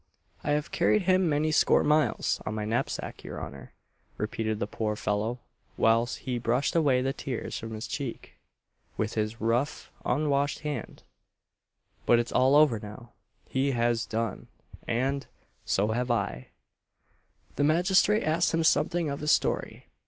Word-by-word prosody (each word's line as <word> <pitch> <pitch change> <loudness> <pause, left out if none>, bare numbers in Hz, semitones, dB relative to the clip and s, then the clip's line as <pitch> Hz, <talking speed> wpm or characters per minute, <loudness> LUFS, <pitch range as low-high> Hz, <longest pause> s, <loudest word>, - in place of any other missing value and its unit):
"I 145 - +1
have 150 0 -1
carried 210 - +2
him 185 -1 +3
many 150 +1 +1
score 155 - +4
miles 150 -5 +1
on 110 - -4
my 105 -1 -3
knapsack, 110 +2 -3
your - - -6
honour," 70 -2 -9 0.4
repeated 110 0 -2
the 105 - -1
poor 105 0 -2
fellow, 105 +4 -2 0.4
whilst 115 +2 +2
he 125 -2 -2
brushed 125 +6 0
away 140 -6 +3
the 135 +1 0
tears 130 -4 -4
from 115 0 -6
his 110 +2 -5
cheek 135 -5 -5 0.6
with 110 0 -1
his 110 +1 -2
rough 120 +6 -1
unwashed 145 +1 0
hand, 150 -2 -5 1.0
"but 120 - +6
it's 120 0 -1
all 130 +2 +4
over 145 -7 +5
now! 105 +3 -10 0.4
He 135 +1 0
has 120 -1 +1
done 115 -2 -3 0.4
and 135 +4 -1 0.4
so 100 +2 +1
have 120 +3 -1
I!" 65 - -1 1.1
The 145 - +1
magistrate 185 +7 +3
asked 165 +2 +1
him 165 - +1
something 170 +1 +2
of 140 -1 -3
his 150 0 +1
story. - - 0
125 Hz, 150 wpm, -28 LUFS, 115-150 Hz, 1.1 s, but